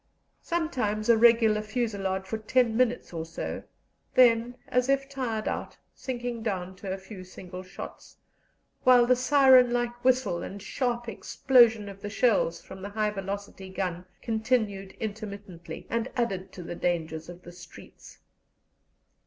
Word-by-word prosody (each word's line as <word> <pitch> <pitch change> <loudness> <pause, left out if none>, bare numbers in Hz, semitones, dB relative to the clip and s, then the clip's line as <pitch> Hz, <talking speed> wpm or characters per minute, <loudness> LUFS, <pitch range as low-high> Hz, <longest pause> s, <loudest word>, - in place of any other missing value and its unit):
Sometimes 250 - -1
a 235 - +8
regular 225 -2 +5
fusillade 205 -4 -2
for 220 +3 -4
ten 230 +1 +2
minutes 245 -4 +1
or 165 -1 -3
so; 165 +1 -5 0.5
then, 240 -1 +5
as 250 +1 +1
if 275 0 +2
tired 250 -6 -3
out, - - -4 0.2
sinking 245 -2 -4
down 190 -4 -3
to 190 0 -6
a 190 - -2
few 190 0 -10
single 185 0 -9
shots, 185 +1 -10 0.7
while 250 -1 +7
the 250 +1 +4
siren 255 -1 +6
like 240 0 -2
whistle 250 -9 +2
and 200 - -6
sharp 240 +3 -2
explosion 230 -3 +3
of 195 0 -10
the 205 - -5
shells 205 -7 +2
from 190 0 -11
the 200 - -5
high 210 0 0
velocity 195 -1 -6
gun 180 -2 -3 0.2
continued 220 -4 -1
intermittently, 200 -5 -7
and 230 +2 -2
added 195 -6 -2
to 180 - -9
the 170 - -6
dangers 165 -2 -2
of 175 +1 -11
the 175 - -10
streets. 175 0 -14
215 Hz, 145 wpm, -28 LUFS, 190-245 Hz, 0.7 s, a